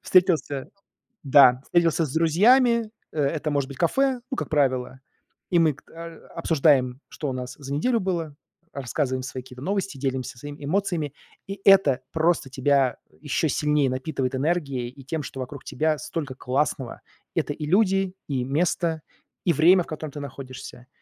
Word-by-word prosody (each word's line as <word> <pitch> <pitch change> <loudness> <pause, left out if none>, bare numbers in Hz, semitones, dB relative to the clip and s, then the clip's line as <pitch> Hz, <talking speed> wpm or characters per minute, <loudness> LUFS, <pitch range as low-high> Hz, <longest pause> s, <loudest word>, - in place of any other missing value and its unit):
встретился, 170 -7 +2 0.6
да, 130 -2 +6
встретился 170 -1 +2
с 135 - -7
друзьями. 225 - +4 0.2
Э, 155 - -2
это 150 +2 0
может 140 -2 0
быть 140 -2 -10
кафе, 265 - +2
ну, 265 - -2
как - - -3
правило, 130 -4 0 0.5
и 175 -2 +3
мы 160 -3 +4
кт - - -21
а 165 0 -10
обсуждаем, 140 -6 +2
что 145 - -4
у - - -3
нас 125 0 -6
за 140 -1 -6
неделю 230 - +1
было, 170 -6 -2 0.4
рассказываем 130 -1 -2
свои 130 0 -6
какие-то 125 -1 -12
новости, 195 -2 -2
делимся 130 -1 -3
своими 145 +3 -9
эмоциями. 170 -3 -1 0.3
И 195 0 -7
это 190 -10 +6
просто 160 -4 +1
тебя 130 -1 +2 0.2
ещё 150 +1 0
сильнее 150 -1 +2
напитывает 130 0 -2
энергией 140 -4 -1
и 135 +2 -12
тем, 150 +2 -3
что 135 -1 -6
вокруг 130 +2 -8
тебя 155 +3 0
столько 145 -1 -5
классного. 130 -1 -2 0.3
Это - - 0
и 150 +1 -5
люди, 195 +1 +2
и 130 -3 -1
место, 160 +2 0 0.4
и 175 - +3
время, 175 +4 +5
в - - -17
котором 155 -1 -6
ты 145 - -6
находишься. 130 -2 -9
150 Hz, 165 wpm, -25 LUFS, 130-170 Hz, 0.6 s, да